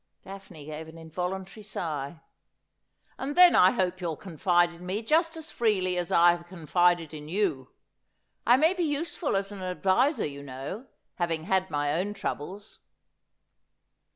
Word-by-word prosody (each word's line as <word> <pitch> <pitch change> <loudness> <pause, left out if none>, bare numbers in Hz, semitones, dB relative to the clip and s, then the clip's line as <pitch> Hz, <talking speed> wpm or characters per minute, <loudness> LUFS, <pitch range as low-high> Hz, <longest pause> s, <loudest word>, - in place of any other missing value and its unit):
Daphne 190 -6 -11
gave 155 +1 -7
an 160 +1 -12
involuntary 180 +5 -5
sigh. 160 -5 -4 0.5
' - - -40
And 285 +4 -4
then 360 -1 +9
I 180 - +7
hope 185 -4 -1
you'll 165 -4 -3
confide 175 0 +1
in 170 +1 -13
me 190 +5 -3
just 325 +6 +2
as 320 -1 -7
freely 190 -6 +1
as 175 -1 -2
I 175 +1 +6
have 170 0 -5
confided 175 -1 +1
in 150 0 -8
you. 165 -9 -1 0.7
I 245 - +5
may 320 +6 +4
be 365 - -3
useful 300 - -1
as 195 +1 -1
an 200 -2 -8
adviser, 195 - +1
you 140 -1 -6
know, 140 - -7 0.3
having 165 -3 -1
had 190 +2 +1
my 145 -1 0
own 195 +6 -1
troubles.' 195 +2 -6
180 Hz, 155 wpm, -28 LUFS, 165-205 Hz, 0.7 s, then